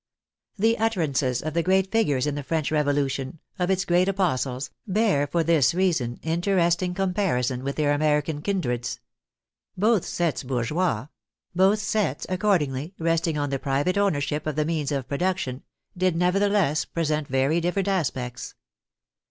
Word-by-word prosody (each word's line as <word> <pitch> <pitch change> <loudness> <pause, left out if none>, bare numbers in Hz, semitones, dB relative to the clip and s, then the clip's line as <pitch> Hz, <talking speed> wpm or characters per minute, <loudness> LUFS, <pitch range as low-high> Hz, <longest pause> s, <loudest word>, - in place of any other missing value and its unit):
The 225 +3 +2
utterances 150 - 0
of 155 0 -3
the 170 - +2
great 190 +2 +2
figures 150 - +2
in 150 - -1
the 145 - -3
French 155 +2 -2
Revolution, 145 -2 0 0.2
of 180 0 0
its 190 0 +1
great 180 +2 +3
apostles, 135 -9 -1 0.2
bear 195 -8 +2
for 165 +3 0
this 165 -1 +3
reason 160 -11 0
interesting 175 +1 +1
comparison 180 - 0
with 140 +1 -3
their 145 -1 +2
American 150 0 0
kindreds. 125 - -2 0.8
Both 215 0 +3
sets 170 -3 -1
bourgeois; 135 +6 -1 0.5
both 190 +4 +4
sets, 210 0 -1
accordingly, 180 -5 0
resting 165 -1 0
on 145 -1 -1
the 135 - -1
private 140 +7 0
ownership 155 -7 0
of 155 - -2
the 150 0 +1
means 155 -3 -1
of 135 -3 -2
production, 140 -4 -2 0.3
did 185 -1 +1
nevertheless 180 -3 +2
present 155 -3 -2
very 135 +6 +1
different 180 +3 -1
aspects. 130 -10 -2
160 Hz, 145 wpm, -25 LUFS, 140-185 Hz, 0.8 s, both